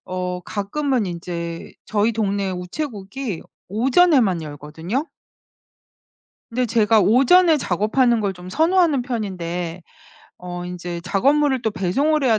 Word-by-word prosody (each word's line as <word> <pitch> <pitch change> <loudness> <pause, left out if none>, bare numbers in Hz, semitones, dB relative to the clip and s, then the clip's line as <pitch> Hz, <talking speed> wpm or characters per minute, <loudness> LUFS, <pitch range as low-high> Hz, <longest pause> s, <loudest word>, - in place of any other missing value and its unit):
어 180 -1 -3
가끔은 225 +5 -1
인제 170 -1 -5
저희 215 +2 +1
동네 200 -3 -1
우체국이 195 - -5 0.3
오전에만 245 - +3
열거든요. 160 - -4 1.4
근데 250 +2 0
제가 225 -1 +3
오전에 275 - +5
작업하는 230 - +1
걸 200 -2 0
좀 180 0 -11
선호하는 325 - +3
편인데 180 -7 -4 0.6
어 175 0 -6
인제 175 -1 -5
작업물을 265 +9 +2
또 220 - +1
배송을 280 - +1
해야 225 -4 +4
205 Hz, 265 characters per minute, -21 LUFS, 180-260 Hz, 1.4 s, 오전에